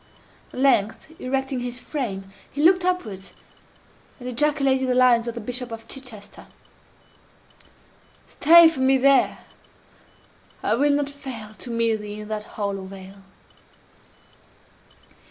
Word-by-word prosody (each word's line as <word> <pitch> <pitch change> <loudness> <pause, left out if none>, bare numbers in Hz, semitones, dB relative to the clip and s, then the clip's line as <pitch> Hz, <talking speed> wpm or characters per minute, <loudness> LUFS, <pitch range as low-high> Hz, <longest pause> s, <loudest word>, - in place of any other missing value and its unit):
At - - -11
length, 260 +1 +1
erecting 265 0 -2
his 245 0 -3
frame, 195 -10 -5 0.2
he 290 - -3
looked 365 +2 +5
upwards, 225 - -3 0.9
and 250 - -8
ejaculated 270 0 +1
the 250 - +2
lines 245 -2 +4
of 235 - -4
the - - -4
Bishop 245 +2 -5
of 225 0 -8
Chichester: 245 -7 -9 1.8
"Stay 335 +2 +7
for 320 -4 -2
me 265 +1 +4
there! 270 0 +3 1.3
I - - +1
will 285 +6 +2
not 285 0 0
fail 265 -6 -8
_To 215 +4 -13
meet 230 -1 0
thee 210 0 -8
in 210 - -10
that 215 -1 -4
hollow 200 -2 -3
vale." 195 +1 -12
250 Hz, 125 wpm, -23 LUFS, 215-275 Hz, 1.8 s, Stay